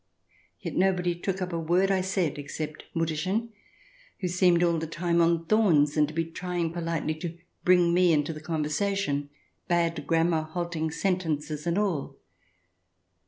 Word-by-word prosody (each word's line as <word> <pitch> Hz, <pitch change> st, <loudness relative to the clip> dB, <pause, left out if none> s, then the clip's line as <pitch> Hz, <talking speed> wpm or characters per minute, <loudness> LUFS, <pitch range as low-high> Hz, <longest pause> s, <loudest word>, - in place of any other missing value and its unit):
Yet -, -, -5 dB
nobody 180 Hz, -2 st, +2 dB
took 190 Hz, +2 st, -3 dB
up 180 Hz, -1 st, -5 dB
a 165 Hz, -, -1 dB
word 180 Hz, +4 st, +2 dB
I 190 Hz, -1 st, +2 dB
said, 185 Hz, -6 st, -1 dB
except 155 Hz, +2 st, -6 dB
Mutterchen, 170 Hz, +8 st, -1 dB, 0.7 s
who 185 Hz, -, -1 dB
seemed 175 Hz, -1 st, +3 dB
all 170 Hz, -1 st, +2 dB
the 160 Hz, -, -4 dB
time 170 Hz, +1 st, +1 dB
on 165 Hz, 0 st, +2 dB
thorns, 165 Hz, -8 st, +3 dB
and 150 Hz, -1 st, +3 dB
to 155 Hz, -, -8 dB
be 165 Hz, 0 st, 0 dB
trying 170 Hz, 0 st, -3 dB
politely 165 Hz, -2 st, -2 dB
to 170 Hz, 0 st, -5 dB, 0.3 s
bring 180 Hz, -2 st, +4 dB
me 180 Hz, 0 st, +4 dB
into 150 Hz, +1 st, +1 dB
the 155 Hz, -, -9 dB
conversation, 155 Hz, -1 st, -1 dB, 0.4 s
bad 165 Hz, -4 st, 0 dB
grammar, 165 Hz, 0 st, +2 dB
halting 160 Hz, 0 st, -3 dB
sentences 155 Hz, -4 st, -2 dB
and 170 Hz, +2 st, +1 dB
all. 190 Hz, -9 st, -1 dB
170 Hz, 155 wpm, -27 LUFS, 155-180 Hz, 0.7 s, bring